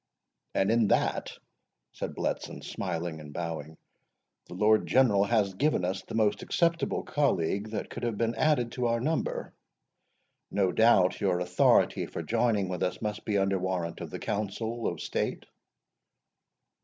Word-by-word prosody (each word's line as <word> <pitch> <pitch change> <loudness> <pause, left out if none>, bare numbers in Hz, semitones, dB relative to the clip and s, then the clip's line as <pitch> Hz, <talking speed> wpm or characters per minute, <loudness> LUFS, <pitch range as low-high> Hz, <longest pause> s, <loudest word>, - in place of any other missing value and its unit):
"And 95 +2 +2
in 115 -2 +3
that," - - 0 0.5
said - - -5
Bletson, - - -3
smiling 85 -3 -4
and 75 -1 -10
bowing, 80 -1 -5 0.7
"the - - -9
Lord 110 +3 +3
General 105 -7 +4
has 105 -3 +1
given 135 -4 +1
us 95 +1 -2
the 95 - -8
most 105 -2 +2
acceptable 170 -1 0
colleague 105 - 0
that 110 -1 -4
could - - -6
have 120 -3 -2
been 115 +1 0
added 125 -2 +1
to 125 -2 -1
our 115 0 +1
number. 155 +6 -2 1.0
No 95 -3 +1
doubt 95 -3 +4
your 95 -3 +2
authority 90 0 +3
for - - -5
joining 105 -6 +1
with 90 0 -4
us 90 - -1
must 105 -1 -4
be 105 -2 +1
under 95 -1 +1
warrant 90 -2 -3
of - - -5
the - - -5
Council 110 +3 -3
of - - -3
State?" - - -2
105 Hz, 155 wpm, -29 LUFS, 90-115 Hz, 1.0 s, General